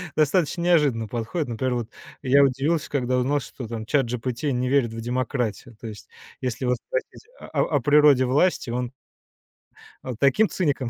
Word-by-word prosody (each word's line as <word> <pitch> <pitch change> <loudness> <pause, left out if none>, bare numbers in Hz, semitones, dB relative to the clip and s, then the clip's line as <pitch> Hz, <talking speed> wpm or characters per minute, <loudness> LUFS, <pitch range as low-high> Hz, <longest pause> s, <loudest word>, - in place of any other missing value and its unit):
достаточно 155 +2 +1
неожиданно 150 -10 +2
подходит. 120 - -3
Например, 125 +2 -1
вот 120 -2 -3 0.4
я 140 +2 +5
удивился, 140 +4 0
когда 130 -3 0
узнал, 135 +4 +1
что 125 -1 -8
там 110 -1 -5
"Чат-джипити" 125 0 -1
не 125 0 -1
верит 130 -4 +2
в 115 - -6
демократию. 120 -1 -3
То 115 - -7
есть, 105 -2 -10 0.3
если 125 0 -3
его 125 0 +2
спросить - - -6
о - - -10 0.3
о - - +1
природе 145 -1 +5
власти, 140 +3 +1
он 125 0 -2 1.1
он 130 -2 -5
таким 140 - +3
циником 145 -8 -1
130 Hz, 160 wpm, -24 LUFS, 120-145 Hz, 1.1 s, я